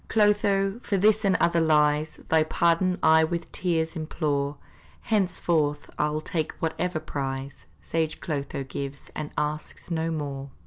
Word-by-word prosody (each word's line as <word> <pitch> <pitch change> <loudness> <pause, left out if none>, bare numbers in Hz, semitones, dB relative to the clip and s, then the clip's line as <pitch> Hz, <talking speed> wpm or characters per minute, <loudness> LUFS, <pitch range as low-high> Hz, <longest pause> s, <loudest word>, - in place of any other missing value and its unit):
Clotho, 205 -1 +2
for 200 - 0
this 215 +3 +4
and 195 -2 +3
other 170 0 +3
lies, 150 -1 +2
Thy 160 0 +5
pardon 170 +3 +2
I 160 0 +6
with 170 +1 -2
tears 165 -2 -1
implore; 150 -3 -1 0.4
Henceforth 170 -7 0
I'll 150 +1 +1
take 155 -1 -2
whatever 165 +1 -2
prize 135 -3 -5
Sage 160 -2 -1
Clotho 140 -3 -3
gives, 140 +1 -6
and 150 - -4
asks 150 +3 -3
no 165 0 0
more. 140 -3 -4
160 Hz, 135 wpm, -26 LUFS, 150-175 Hz, 0.4 s, I